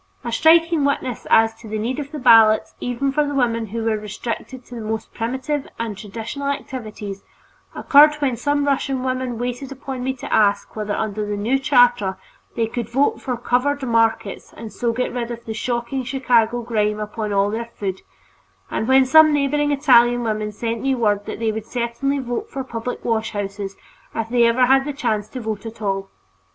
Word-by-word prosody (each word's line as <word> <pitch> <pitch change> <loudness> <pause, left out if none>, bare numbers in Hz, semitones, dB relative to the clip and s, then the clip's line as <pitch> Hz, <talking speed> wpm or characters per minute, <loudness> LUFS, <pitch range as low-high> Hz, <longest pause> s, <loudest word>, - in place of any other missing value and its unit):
A 235 - -4
striking 325 +5 +4
witness 270 -4 -1
as 225 0 +5
to 230 - -11
the 215 - -2
need 240 +6 -2
of 285 -1 -6
the 305 - -5
ballot, 225 -4 +6
even 245 +3 -1
for 300 +2 +2
the 285 -1 -3
women 230 -4 +1
who 225 +2 -3
are 215 -1 +1
restricted 235 +4 -6
to - - -13
the 235 - -6
most 220 0 -4
primitive 260 +5 -3
and 230 -2 -3
traditional 225 +7 -6
activities, 215 -8 -5 0.5
occurred 300 +1 +6
when 280 -4 0
some 285 +4 0
Russian 270 -2 0
women 255 -2 -2
waited 245 +3 -4
upon 265 -1 -6
me 265 +1 -1
to 260 - -6
ask 205 -1 +2
whether 210 -1 -2
under 215 -1 -2
the 205 0 -3
new 235 +7 +1
charter 245 -8 +3 0.4
they 230 - +1
could 235 0 -4
vote 270 +4 +1
for 250 -2 -3
covered 260 +4 0
markets 225 -4 0
and 225 -2 -8
so 235 -1 -1
get 245 +2 -2
rid 240 -1 -3
of 235 0 -7
the 225 - -4
shocking 240 +3 -2
Chicago 240 -2 +1
grime 210 -2 0
upon 210 0 -4
all 200 0 +2
their 230 +2 -3
food; 190 -2 -4 0.7
and 220 - -2
when 265 0 +5
some 310 +4 +7
neighboring 290 0 +1
Italian 245 -4 +4
women 215 -1 -2
sent 230 +1 -3
me 270 0 +1
word 205 -4 0
that - - -5
they 225 0 0
would 220 0 -6
certainly 245 +4 -1
vote 260 - -4
for 270 - -4
public 235 -1 -5
washhouses 205 -3 -2 0.4
if 225 0 -2
they 240 -1 +4
ever 250 +2 +4
had 270 +1 +4
the 290 +1 -4
chance 220 -7 -2
to 255 - -6
vote 220 -2 -4
at 225 0 -10
all. 195 -2 -2
235 Hz, 190 wpm, -21 LUFS, 220-265 Hz, 0.7 s, some